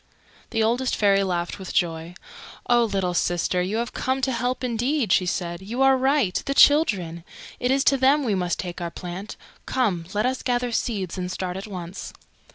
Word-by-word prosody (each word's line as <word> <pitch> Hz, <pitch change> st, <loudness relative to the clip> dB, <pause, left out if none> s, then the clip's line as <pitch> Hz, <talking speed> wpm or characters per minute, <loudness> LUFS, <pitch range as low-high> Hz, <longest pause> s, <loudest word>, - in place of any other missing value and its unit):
The 225 Hz, -, 0 dB
Oldest 245 Hz, +3 st, +1 dB
Fairy 200 Hz, -1 st, +3 dB
laughed 175 Hz, 0 st, -2 dB
with 190 Hz, -, -7 dB
joy. 165 Hz, -1 st, -1 dB, 0.5 s
"Oh, 240 Hz, -1 st, +4 dB
little 190 Hz, -4 st, -1 dB
sister, 175 Hz, +1 st, 0 dB
you 190 Hz, +5 st, -1 dB
have 235 Hz, +1 st, -3 dB
come 260 Hz, +1 st, -1 dB
to 265 Hz, -, +1 dB
help 250 Hz, +2 st, -2 dB
indeed!" 245 Hz, 0 st, 0 dB
she 185 Hz, -, +3 dB
said. 175 Hz, 0 st, -3 dB
"You 235 Hz, +7 st, -1 dB
are 270 Hz, 0 st, +6 dB
right. 265 Hz, -7 st, +1 dB
The 275 Hz, -, -1 dB
Children! 190 Hz, -, +4 dB, 0.4 s
It 250 Hz, -, 0 dB
is 270 Hz, +1 st, +3 dB
to 275 Hz, -, +4 dB
them 275 Hz, +3 st, +4 dB
we 225 Hz, -5 st, 0 dB
must 180 Hz, -2 st, -1 dB
take 175 Hz, -1 st, -5 dB
our 170 Hz, -, -2 dB
plant. 180 Hz, +4 st, -7 dB, 0.3 s
Come, 195 Hz, -10 st, 0 dB
let 210 Hz, -, +1 dB
us 260 Hz, +1 st, -1 dB
gather 245 Hz, -2 st, 0 dB
seeds 195 Hz, -6 st, -2 dB
and 180 Hz, 0 st, -3 dB
start 185 Hz, -1 st, -4 dB
at 195 Hz, +3 st, -6 dB
once." 180 Hz, -2 st, -7 dB
205 Hz, 190 wpm, -24 LUFS, 180-255 Hz, 0.5 s, are